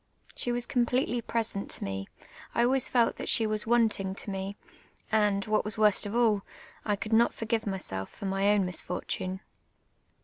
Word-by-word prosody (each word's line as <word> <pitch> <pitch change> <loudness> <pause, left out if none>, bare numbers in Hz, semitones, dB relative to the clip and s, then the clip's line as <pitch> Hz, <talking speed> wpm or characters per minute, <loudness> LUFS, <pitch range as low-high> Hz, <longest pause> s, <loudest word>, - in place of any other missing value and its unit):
She 245 - -1
was 240 0 -1
completely 245 0 +1
present 225 -4 -2
to - - -2
me; 95 0 -4 0.5
I 235 - +4
always 260 +1 +2
felt 240 -2 +2
that - - -4
she 225 - +4
was 215 0 0
wanting 220 -5 +2
to 200 - -5
me; 195 +1 -4 0.5
and, 210 -2 +2
what 215 0 +1
was 210 0 -4
worst 210 -1 +4
of 205 - -5
all, 225 -4 +3 0.4
I 210 - +1
could 215 +2 -4
not 230 +1 +4
forgive 225 -1 -1
myself 95 - -3
for - - -9
ray 195 +1 +2
own 200 -2 +2
misfortune. 185 +1 -3
215 Hz, 175 wpm, -29 LUFS, 195-235 Hz, 0.5 s, I